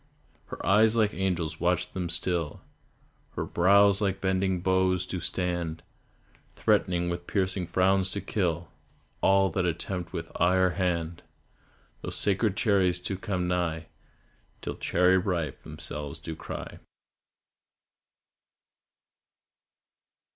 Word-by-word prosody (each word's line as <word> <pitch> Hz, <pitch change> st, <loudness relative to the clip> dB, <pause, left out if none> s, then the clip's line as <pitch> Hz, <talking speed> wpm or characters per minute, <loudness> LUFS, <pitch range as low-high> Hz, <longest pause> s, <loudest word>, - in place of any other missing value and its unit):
Her -, -, -7 dB
eyes 110 Hz, +3 st, +5 dB
like 110 Hz, -2 st, +2 dB
angels 85 Hz, -4 st, -1 dB
watch 90 Hz, 0 st, 0 dB
them 90 Hz, -2 st, -3 dB
still, 85 Hz, -2 st, -1 dB, 0.7 s
Her -, -, -2 dB
brows 100 Hz, +3 st, +4 dB
like 100 Hz, -2 st, 0 dB
bended 95 Hz, -1 st, 0 dB
bows 95 Hz, -1 st, +2 dB
do 95 Hz, 0 st, -4 dB
stand, 85 Hz, -2 st, -3 dB, 0.7 s
Threatening 85 Hz, -1 st, +2 dB
with 85 Hz, 0 st, -4 dB
piercing 95 Hz, -2 st, -1 dB
frowns 95 Hz, +2 st, +2 dB
to 100 Hz, -, -3 dB
kill 85 Hz, -6 st, -2 dB, 0.5 s
All 95 Hz, -1 st, +4 dB
that 90 Hz, +3 st, 0 dB
attempt 90 Hz, +1 st, -3 dB
with 80 Hz, 0 st, -5 dB
eye 90 Hz, +1 st, +4 dB
or 95 Hz, -1 st, +3 dB
hand 85 Hz, -3 st, -1 dB, 0.8 s
Those -, -, -5 dB
sacred 100 Hz, 0 st, +1 dB
cherries 95 Hz, -4 st, +2 dB
to 95 Hz, -, -3 dB
come 90 Hz, -1 st, -2 dB
nigh 85 Hz, -3 st, -1 dB, 0.7 s
Till -, -, -3 dB
"Cherry 90 Hz, +1 st, +3 dB
ripe" 90 Hz, -5 st, -2 dB
themselves 75 Hz, +1 st, -6 dB
do 80 Hz, +1 st, -6 dB
cry. -, -, -7 dB
90 Hz, 115 wpm, -28 LUFS, 85-95 Hz, 0.8 s, eyes